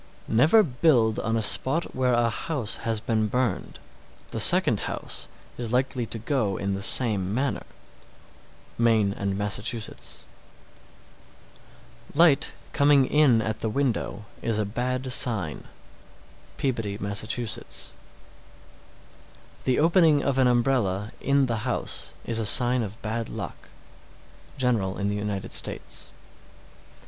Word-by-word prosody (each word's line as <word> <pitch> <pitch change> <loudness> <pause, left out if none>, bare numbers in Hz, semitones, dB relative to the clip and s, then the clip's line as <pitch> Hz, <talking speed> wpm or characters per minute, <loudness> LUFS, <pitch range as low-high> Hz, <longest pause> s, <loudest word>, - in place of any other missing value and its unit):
703. - - -4
Never 160 - +6
build 125 - +2
on 115 +1 -1
a 110 - 0
spot 145 +10 +3
where 130 -1 +1
a 120 0 +2
house 120 0 -3
has 115 -1 -2
been 110 -1 0
burned. 125 -3 -2 0.5
The - - -4
second - - +4
house - - -3 0.3
is 120 -1 -3
likely 125 -2 0
to 115 - -6
go 115 -5 -1
in 100 0 -2
the 100 - -4
same 100 -4 +1
manner. 135 +2 -1 1.2
Maine 110 -4 +3
and 100 -1 -3
Massachusetts. 105 +3 -4 1.9
704. 145 - -5
Light 145 -5 +2 0.2
coming 140 -1 +4
in 130 -6 +3
at 110 -1 -3
the 110 - -2
window 115 -4 -2 0.2
is 115 -2 -1
a 105 - 0
bad 125 +4 -2
sign. 100 -12 +2 0.9
Peabody, 115 -7 -2
Mass. 100 -1 -3
705. 115 +1 -3 1.7
The 130 - +2
opening 160 -2 +4
of 135 -1 0
an 130 - +4
umbrella 120 -5 0
in 140 0 +2
the 115 -3 -2
house 120 +3 -3
is 115 -1 -2
a 110 - -1
sign 125 +3 +5
of 110 0 -6
bad 110 +1 -3
luck. - - -8 0.9
_General 115 -8 0
in 100 0 -1
the 100 - -2
United 105 -2 -4
States. - - -5
115 Hz, 130 wpm, -25 LUFS, 105-130 Hz, 1.9 s, Never